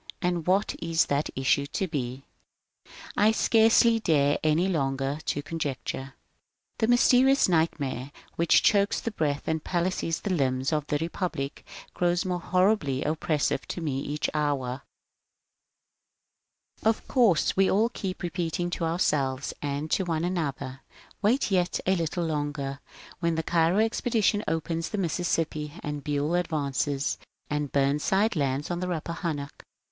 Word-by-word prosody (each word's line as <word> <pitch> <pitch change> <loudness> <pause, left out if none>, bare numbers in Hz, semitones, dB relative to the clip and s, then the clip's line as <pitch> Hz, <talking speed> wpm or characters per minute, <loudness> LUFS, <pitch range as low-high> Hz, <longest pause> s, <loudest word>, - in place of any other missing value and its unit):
And 175 -2 -1
what 195 +3 +2
is 165 0 +2
that 145 +1 0
issue 135 +1 +1
to 190 - -2
be? 135 -4 -4 0.9
I 210 +1 +5
scarcely 225 +1 +4
dare, 145 -7 +2
any 155 +4 +3
longer, 135 -4 -1
to 145 - -1
conjecture. 140 -4 -4 0.6
This 220 - +2
mysterious 255 +3 +5
nightmare, 145 -6 0 0.2
which 170 0 +4
chokes 200 -1 +3
the 230 - -3
breath 150 -7 -1
and 160 -1 -1
palsies 175 -2 -1
the 200 - 0
limbs 130 -2 0
of 150 -1 -1
the 145 - +1
Republic, 165 -3 -3 0.3
grows 175 +1 +1
more 180 -1 -1
horribly 180 -7 +1
oppressive 155 -2 0
to - - -4
me 145 -5 -2
each 145 +2 -2
hour. 140 -4 -1 2.0
Of 220 0 +1
course, 225 - +3
we 195 0 +4
all 220 +4 +3
keep 190 -6 -5
repeating 175 0 -2
to 170 - -2
ourselves 145 -5 0
and 145 +2 -3
to 190 - +2
one 165 -2 -1
another: 140 -7 -3 0.2
^^ - - -21 0.2
Wait 220 +2 +2
yet 180 -2 +1
a 190 - +3
little 170 0 -1
longer. 145 -3 -3 0.4
When 170 -2 0
the 160 - -1
Cairo 165 +3 +2
expedition 220 -1 +1
opens 165 +1 -2
the 210 - -3
Mississippi, 165 -4 -1
and 150 -1 -4
BueU 150 +4 0
advances, 145 -3 -1 0.3
and 150 -2 -1
Bumside 150 +10 +2
lands 140 +1 -1
on 175 - -2
the 180 - -2
Rappahannock, 165 -3 -3
etc. - - -18
160 Hz, 140 wpm, -27 LUFS, 145-185 Hz, 2.0 s, I